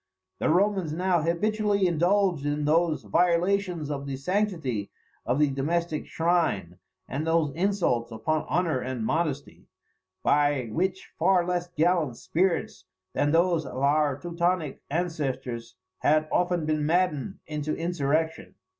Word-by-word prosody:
The -, -, +1 dB
Romans 190 Hz, -1 st, +2 dB
now 180 Hz, 0 st, +1 dB
habitually 200 Hz, +4 st, +1 dB
indulged 175 Hz, -1 st, +2 dB
in 145 Hz, 0 st, -1 dB
those 160 Hz, -2 st, +2 dB
violations 175 Hz, -, +1 dB
of 140 Hz, -1 st, -4 dB
the 135 Hz, -, -3 dB
sanctity 160 Hz, -, -1 dB, 0.4 s
of 125 Hz, -, +1 dB
the 150 Hz, -1 st, +3 dB
domestic 155 Hz, +3 st, -1 dB
shrine, 160 Hz, -, 0 dB, 0.3 s
and 150 Hz, +4 st, -3 dB
those 165 Hz, -3 st, +2 dB
insults 170 Hz, -10 st, 0 dB
upon 115 Hz, +8 st, -1 dB
honour 170 Hz, -6 st, +1 dB
and 125 Hz, -3 st, -3 dB
modesty, 145 Hz, -1 st, -2 dB, 0.6 s
by 145 Hz, -5 st, +2 dB
which 190 Hz, -, -2 dB
far 180 Hz, +1 st, +3 dB
less 175 Hz, -1 st, -1 dB
gallant 165 Hz, -6 st, +1 dB
spirits 170 Hz, -, -1 dB, 0.3 s
than 145 Hz, -, +1 dB
those 170 Hz, 0 st, +3 dB
of 130 Hz, -, -8 dB
our 145 Hz, 0 st, +2 dB
Teutonic 170 Hz, -1 st, -1 dB
ancestors 135 Hz, -, -3 dB, 0.2 s
have 155 Hz, +1 st, +3 dB
often 175 Hz, -2 st, +1 dB
been 155 Hz, -1 st, 0 dB
maddened 175 Hz, +2 st, 0 dB
into 150 Hz, -1 st, -3 dB
insurrection. 160 Hz, -, -1 dB
160 Hz, 130 wpm, -27 LUFS, 140-180 Hz, 0.6 s, the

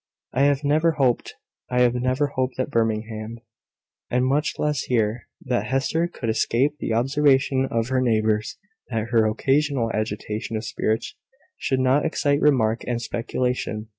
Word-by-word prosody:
"I 130 Hz, -, +1 dB
have 145 Hz, 0 st, +2 dB
never 155 Hz, +3 st, +3 dB
hoped 130 Hz, -5 st, 0 dB, 0.3 s
I 125 Hz, 0 st, +4 dB
never 130 Hz, +4 st, 0 dB
hoped 130 Hz, 0 st, -1 dB
at 130 Hz, -, -1 dB
Birmingham, 110 Hz, 0 st, -2 dB, 0.7 s
and 125 Hz, +1 st, +1 dB
much 140 Hz, +3 st, +1 dB
less 150 Hz, -3 st, 0 dB
here 115 Hz, -1 st, 0 dB, 0.2 s
that 125 Hz, -, -1 dB
Hester 135 Hz, +6 st, 0 dB
could 135 Hz, -8 st, -7 dB
escape 125 Hz, +6 st, +1 dB
the -, -, -3 dB
observation 135 Hz, +2 st, +2 dB
of 115 Hz, +1 st, -1 dB
her 130 Hz, -1 st, +1 dB
neighbours 110 Hz, -3 st, +1 dB, 0.3 s
that 115 Hz, -1 st, -2 dB
her 115 Hz, -2 st, +3 dB
occasional 135 Hz, +1 st, +1 dB
agitation 110 Hz, +1 st, -3 dB
of 110 Hz, -, -5 dB
spirits 110 Hz, +1 st, -2 dB, 0.4 s
should 130 Hz, -, -1 dB
not 130 Hz, +3 st, +3 dB
excite 145 Hz, -3 st, +1 dB
remark 115 Hz, -6 st, +2 dB
and 120 Hz, -1 st, -1 dB
speculation. 120 Hz, -2 st, -3 dB
125 Hz, 145 wpm, -23 LUFS, 115-135 Hz, 0.7 s, I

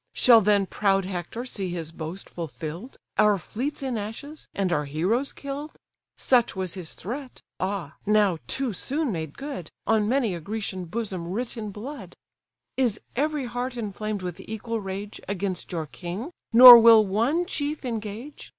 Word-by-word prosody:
Shall 235 Hz, -3 st, +6 dB
then 205 Hz, -1 st, +3 dB
proud 195 Hz, 0 st, +1 dB
Hector 185 Hz, +6 st, -5 dB
see 195 Hz, -7 st, -2 dB
his 165 Hz, -2 st, -5 dB
boast 165 Hz, +3 st, -7 dB
fulfill'd, 170 Hz, -, -7 dB, 0.2 s
Our 210 Hz, -1 st, +5 dB
fleets 255 Hz, -, -4 dB
in 255 Hz, -4 st, -2 dB
ashes, 280 Hz, +9 st, -7 dB
and 190 Hz, -3 st, 0 dB
our 150 Hz, -3 st, 0 dB
heroes 185 Hz, -, 0 dB
kill'd? 285 Hz, +2 st, -7 dB, 0.4 s
Such 245 Hz, -5 st, +3 dB
was 185 Hz, -2 st, -3 dB
his 180 Hz, -4 st, -6 dB
threat, 255 Hz, -, -7 dB, 0.2 s
ah! 185 Hz, -7 st, -3 dB
now 205 Hz, -5 st, +3 dB
too 265 Hz, -4 st, -1 dB
soon 280 Hz, -, -1 dB
made 160 Hz, -5 st, -5 dB
good, 275 Hz, -, -6 dB, 0.2 s
On 215 Hz, -1 st, +2 dB
many 245 Hz, -6 st, +1 dB
a 170 Hz, -, -4 dB
Grecian 200 Hz, 0 st, -4 dB
bosom 185 Hz, -2 st, -4 dB
writ 225 Hz, +7 st, -3 dB
in 215 Hz, -3 st, -5 dB
blood. 210 Hz, -, -8 dB, 0.6 s
Is 240 Hz, -5 st, +1 dB, 0.2 s
every 295 Hz, +1 st, 0 dB
heart 245 Hz, +1 st, -4 dB
inflamed 215 Hz, -2 st, -4 dB
with 180 Hz, -2 st, -5 dB
equal 220 Hz, +1 st, -4 dB
rage 200 Hz, +2 st, -6 dB
Against 195 Hz, -1 st, -3 dB
your 165 Hz, -3 st, -2 dB
king, 185 Hz, -, -6 dB, 0.2 s
nor 245 Hz, +1 st, +12 dB
will 225 Hz, -2 st, +8 dB
one 235 Hz, -, +1 dB
chief 295 Hz, -4 st, -3 dB
engage? 225 Hz, +4 st, -6 dB
210 Hz, 160 wpm, -26 LUFS, 185-250 Hz, 0.6 s, nor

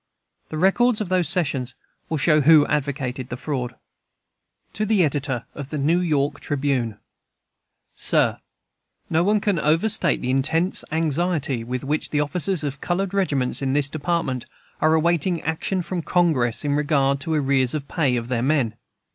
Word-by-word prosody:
The 155 Hz, -, -5 dB
records 215 Hz, +7 st, +3 dB
of 210 Hz, -4 st, -3 dB
those 180 Hz, -5 st, +2 dB
sessions 135 Hz, -8 st, 0 dB, 0.3 s
will 160 Hz, -, -1 dB
show 150 Hz, +1 st, +3 dB
who 150 Hz, 0 st, +6 dB
advocated 135 Hz, -4 st, -2 dB
the 125 Hz, -, -5 dB
fraud. 125 Hz, -3 st, -4 dB, 1.0 s
To 215 Hz, -, -2 dB
the 210 Hz, -3 st, +3 dB
Editor 140 Hz, -5 st, -1 dB
of 140 Hz, -1 st, -7 dB
the 150 Hz, -, -4 dB
New 155 Hz, +5 st, +2 dB
York 145 Hz, -4 st, 0 dB
Tribune: 135 Hz, -6 st, -1 dB, 1.0 s
SIR, -, -, +1 dB, 0.7 s
No 165 Hz, +1 st, +3 dB
one 210 Hz, +3 st, +3 dB
can 200 Hz, -4 st, 0 dB
overstate 165 Hz, +3 st, +2 dB
the 125 Hz, -, -2 dB
intense 160 Hz, +7 st, 0 dB
anxiety 160 Hz, -4 st, 0 dB
with 125 Hz, +1 st, -4 dB
which 150 Hz, +3 st, -2 dB
the 150 Hz, -, 0 dB
officers 155 Hz, +3 st, 0 dB
of 140 Hz, -1 st, -4 dB
colored 185 Hz, +2 st, -1 dB
regiments 145 Hz, -12 st, 0 dB
in 135 Hz, -1 st, 0 dB
this 145 Hz, 0 st, +2 dB
Department 155 Hz, -4 st, -2 dB, 0.3 s
are 155 Hz, +1 st, +4 dB
awaiting 170 Hz, +1 st, +1 dB
action 170 Hz, +4 st, -1 dB
from 180 Hz, 0 st, -3 dB
Congress 155 Hz, -9 st, +1 dB
in 145 Hz, -, +1 dB
regard 140 Hz, -2 st, +1 dB
to 160 Hz, +3 st, -2 dB
arrears 135 Hz, -2 st, +1 dB
of 140 Hz, -2 st, -4 dB
pay 145 Hz, -7 st, +1 dB
of 120 Hz, -1 st, -3 dB
their 120 Hz, -2 st, -1 dB
men. 130 Hz, -5 st, +1 dB
150 Hz, 160 wpm, -23 LUFS, 135-170 Hz, 1.0 s, who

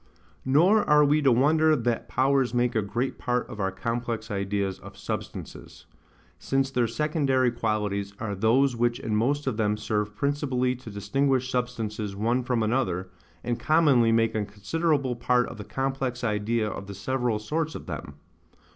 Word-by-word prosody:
Nor 175 Hz, +11 st, +4 dB
are 150 Hz, 0 st, +6 dB
we 150 Hz, +2 st, +3 dB
to 135 Hz, -3 st, +4 dB
wonder 155 Hz, +5 st, +4 dB
that 120 Hz, -3 st, -2 dB
powers 135 Hz, -1 st, +2 dB
make 120 Hz, 0 st, +2 dB
a 110 Hz, -, +3 dB
great 120 Hz, +6 st, -3 dB
part 125 Hz, 0 st, -1 dB
of 105 Hz, -, -9 dB
our 95 Hz, -1 st, +1 dB
complex 115 Hz, +2 st, -3 dB
ideas 100 Hz, -1 st, -2 dB
of -, -, -12 dB
substances; -, -, -7 dB, 0.5 s
since 135 Hz, 0 st, 0 dB
their 125 Hz, -3 st, +1 dB
secondary 135 Hz, -1 st, +1 dB
qualities 105 Hz, -3 st, -2 dB
are 110 Hz, -2 st, -3 dB
those 120 Hz, +6 st, +2 dB
which 120 Hz, 0 st, 0 dB
in 110 Hz, -2 st, -2 dB
most 140 Hz, +7 st, +1 dB
of 130 Hz, -5 st, -1 dB
them 105 Hz, -1 st, +1 dB
serve 105 Hz, -1 st, -2 dB
principally 130 Hz, -2 st, 0 dB
to 125 Hz, -2 st, -11 dB
distinguish 130 Hz, +6 st, 0 dB
substances 110 Hz, -5 st, -3 dB
one 115 Hz, +5 st, +1 dB
from 120 Hz, -2 st, 0 dB
another, 95 Hz, -6 st, -1 dB, 0.3 s
and 120 Hz, 0 st, -2 dB
commonly 145 Hz, -8 st, +4 dB
make 115 Hz, 0 st, +2 dB
a 110 Hz, -, 0 dB
considerable 130 Hz, +7 st, -1 dB
part 125 Hz, +1 st, +2 dB
of -, -, -9 dB
the -, -, -5 dB
complex 135 Hz, +1 st, -3 dB
idea 110 Hz, 0 st, 0 dB
of 100 Hz, -2 st, -6 dB
the 100 Hz, -, -7 dB
several 120 Hz, +2 st, -1 dB
sorts 155 Hz, +9 st, -2 dB
of -, -, -7 dB
them. 70 Hz, -, -7 dB
120 Hz, 165 wpm, -26 LUFS, 105-135 Hz, 0.5 s, are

